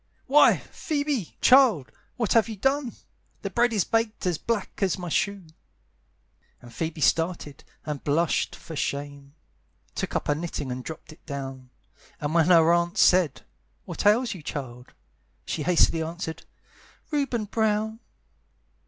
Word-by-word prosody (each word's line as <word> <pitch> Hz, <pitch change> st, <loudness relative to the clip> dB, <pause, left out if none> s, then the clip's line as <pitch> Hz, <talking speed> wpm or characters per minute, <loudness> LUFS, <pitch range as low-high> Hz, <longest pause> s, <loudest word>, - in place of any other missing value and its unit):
"Why, 290 Hz, +3 st, +6 dB
Phoebe, 285 Hz, -, -3 dB
child, 250 Hz, -, +5 dB, 0.3 s
what 230 Hz, -5 st, 0 dB
have 230 Hz, 0 st, +4 dB
you 220 Hz, -, -5 dB
done? 270 Hz, +3 st, 0 dB, 0.5 s
The -, -, -3 dB
bread 240 Hz, 0 st, +2 dB
is 210 Hz, -5 st, +2 dB
baked 225 Hz, -2 st, -1 dB
as 175 Hz, -4 st, 0 dB
black 225 Hz, -4 st, -3 dB
as 190 Hz, -3 st, +1 dB
my 180 Hz, -1 st, -5 dB
shoe!" 200 Hz, +1 st, -1 dB, 1.1 s
And 120 Hz, -1 st, -14 dB
Phoebe 160 Hz, +3 st, -4 dB
started, 165 Hz, -3 st, 0 dB, 0.2 s
and 150 Hz, -3 st, -5 dB
blushed 160 Hz, +4 st, +1 dB
for 160 Hz, -, -10 dB
shame, 140 Hz, 0 st, -4 dB, 0.6 s
Took -, -, -4 dB
up -, -, -1 dB
her 145 Hz, -, +3 dB
knitting 150 Hz, -4 st, -4 dB
and 125 Hz, 0 st, -5 dB
dropped 160 Hz, +1 st, -9 dB
it -, -, -23 dB
down; 135 Hz, -3 st, -6 dB, 0.5 s
And 145 Hz, +1 st, -3 dB
when 165 Hz, -1 st, +4 dB
her 170 Hz, -2 st, +6 dB
aunt 175 Hz, +3 st, 0 dB
said, 180 Hz, -7 st, +4 dB, 0.4 s
"What -, -, -2 dB
ails 230 Hz, +4 st, +3 dB
you, 180 Hz, -, -10 dB
child?" 125 Hz, -4 st, -7 dB, 0.5 s
She 160 Hz, -, -3 dB
hastily 165 Hz, 0 st, +3 dB
answered, 160 Hz, 0 st, -5 dB, 0.6 s
"Reuben 275 Hz, -7 st, -1 dB
Brown." 220 Hz, +1 st, 0 dB
175 Hz, 145 wpm, -26 LUFS, 150-220 Hz, 1.1 s, Why